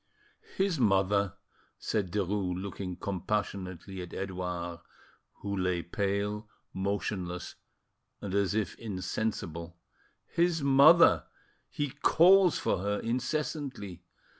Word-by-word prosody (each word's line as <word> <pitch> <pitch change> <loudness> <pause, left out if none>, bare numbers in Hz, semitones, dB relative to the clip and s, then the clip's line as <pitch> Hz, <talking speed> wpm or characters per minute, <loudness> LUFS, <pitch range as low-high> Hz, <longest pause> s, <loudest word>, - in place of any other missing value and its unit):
"His 190 -5 +1
mother," 100 -2 +2 0.4
said 100 -5 -2
Derues, 95 -2 -1
looking 95 -1 -5
compassionately 95 -1 -3
at 90 - -8
Edouard, 90 -3 -4 0.6
who 100 0 -2
lay 90 -2 0
pale, 100 +3 -2 0.2
motionless, 95 -2 -3 0.7
and 100 -2 -5
as 100 0 +1
if 110 -2 0
insensible,—"his 95 - -3
mother! 140 +5 +7 0.4
He 145 -2 -2
calls 180 +5 +5
for - - 0
her 100 +2 -1
incessantly. 125 - -3
100 Hz, 90 wpm, -30 LUFS, 90-115 Hz, 0.7 s, mother